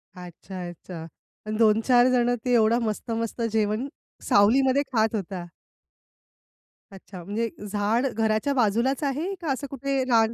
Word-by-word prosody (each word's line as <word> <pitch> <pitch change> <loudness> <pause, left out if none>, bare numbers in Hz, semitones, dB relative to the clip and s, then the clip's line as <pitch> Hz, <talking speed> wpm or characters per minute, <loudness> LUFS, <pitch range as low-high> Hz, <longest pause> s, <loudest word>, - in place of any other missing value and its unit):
अच्छा, 180 +1 -8
अच्छा 170 -1 -9 0.4
आणि 215 0 -2
2-4 230 +3 +4
जण 245 -1 +2
ते 250 - +1
एवढं 230 0 +4
मस्त-मस्त 230 +1 -3
जेवण, 215 +3 0 0.4
सावलीमध्ये 260 +7 +4
खात 220 -1 +2
होता. 185 -3 -5 1.4
अच्छा. 185 -2 -11
म्हणजे 215 +5 -2 0.2
झाड 215 +5 +1
घराच्या 225 +2 0
बाजूलाच 245 +3 +1
आहे 295 +7 -1
का 320 -4 -2
असं 275 +1 -3
कुठे 275 0 -1
रान 225 -1 +3
225 Hz, 130 wpm, -25 LUFS, 205-255 Hz, 1.4 s, 2-4